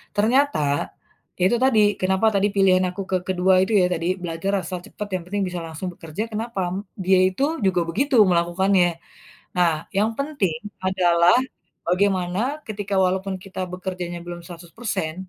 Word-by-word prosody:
ternyata 255 - +3 0.8
ya, - - +1
itu 240 - +2
tadi, 235 -5 +4 0.2
kenapa 190 +3 +1
tadi 200 +1 +3
pilihan 190 -2 +4
aku 190 - -6
ke 185 - +3
kedua 185 0 +2
itu 195 - -3
ya - - +4
tadi, 170 0 -2 0.2
belajar 165 +3 -2
asal 180 -1 -5
cepat 210 -1 -7
yang 180 - -3
penting 200 +1 -1
bisa 180 -1 -4
langsung 160 +3 -6
bekerja, 165 +5 -5
kenapa? 220 -2 -3 0.4
Dia 190 0 +5
itu 190 +9 -3 0.2
juga 185 -2 +2
begitu 270 - 0 0.2
melakukannya. 175 +2 +3 0.7
Nah, 175 -2 +4 0.3
yang 215 +3 +2
penting 275 - -1 0.3
adalah 175 -2 +4 0.5
bagaimana 185 0 +1 0.3
ketika 205 -2 -3
walaupun 190 +1 -1
kita 190 -1 -9
bekerjanya 180 -1 -5
belum 175 0 -7
100%, 175 0 -5
185 Hz, 150 wpm, -23 LUFS, 175-205 Hz, 0.8 s, Dia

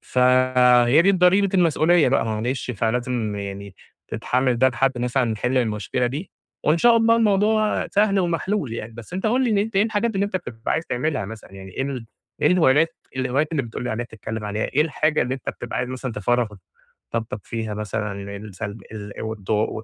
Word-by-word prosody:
فهي 125 +1 +4
دي 195 - +5
الضريبة، 190 +1 +4
المسؤولية 170 -2 +4
بقى، 135 -2 +2
معلش، 115 +4 -2
فلازم 115 -1 -1
يعني 100 -1 -6 0.3
تتحمَّل 125 -1 0
ده 130 +2 +5
لحد 130 +1 0
مثلًا 125 +1 +1
نحِلّ 120 +3 -1
المشكلة 115 +1 -1
دي، 145 +9 -5 0.3
وإن 155 +3 +3
شاء 235 +4 +6
الله 230 0 +4
الموضوع 215 0 +2
سهل 200 -1 +2
ومحلول 175 - -1
يعني. 115 0 -6
بس 115 +8 -11
أنتَ 190 +4 -2
قُل 245 0 +2
لي، 200 - +3
أنتَ 220 -2 -5
إيه 195 - +5
الحاجات 220 +1 0
اللي 195 +1 +1
أنتَ 200 - -2
بتبقى 115 -10 -4
عايِز 160 +2 -1
تعملها 130 -2 -1
مثلًا؟ 110 -1 -10
يعني 95 -1 -10
إيه 135 -1 -3 0.4
إيه - - +4
الهِولات 165 -2 +3 0.2
الهوايات 130 +4 0
اللي 140 -4 +1
بتقُل 115 0 -6
لي 125 - -2
عليها، 120 +2 -2
بتتكلَّم 110 0 -6
عليها، 105 +1 -2
إيه 145 - 0
الحاجة 155 0 +1
اللي 125 +2 -2
أنتَ 135 - -8
بتبقى 120 - -7
عايِز 125 0 -2
مثلًا 130 -1 -5
تفرغ 115 +1 0 0.6
طاقتَك 115 -1 -3
فيها 110 -2 -4
مثلًا، 105 0 -3 0.3
السلب 105 0 -7
ال 105 -2 -7
والضغو 110 0 -2
و - - -6
125 Hz, 185 wpm, -23 LUFS, 110-170 Hz, 0.6 s, شاء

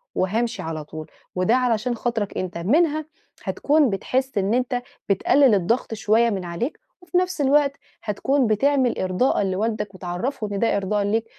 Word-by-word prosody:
وهامشي 225 +6 0
على 160 -1 -4
طول، 155 +1 -8 0.3
وده 185 +6 +3
علشان 245 -1 +1
خاطرك 225 -3 -2
أنت." 185 -2 -3
منها 305 - +2 0.4
هتكون 295 -2 +2
بتحس 255 +5 -1
إن 200 +2 +1
أنت 250 0 0 0.3
بتقلّل 250 +5 +4
الضغط 225 +6 0
شوية 225 +2 +3
من 195 -4 -3
عليك، 175 - -4 0.2
وفي 360 0 -1
نفس 365 -3 0
الوقت 280 0 +3 0.3
هتكون 260 +5 +1
بتعمل 260 +3 +2
إرضاءً 185 +5 +1
لوالدك 205 +1 -2
وتعرّفه 185 +7 -3
إن 200 -1 -3
ده 230 -2 +2
إرضاءً 200 +1 0
ليك 220 +3 0
225 Hz, 155 wpm, -23 LUFS, 195-265 Hz, 0.4 s, بتقلّل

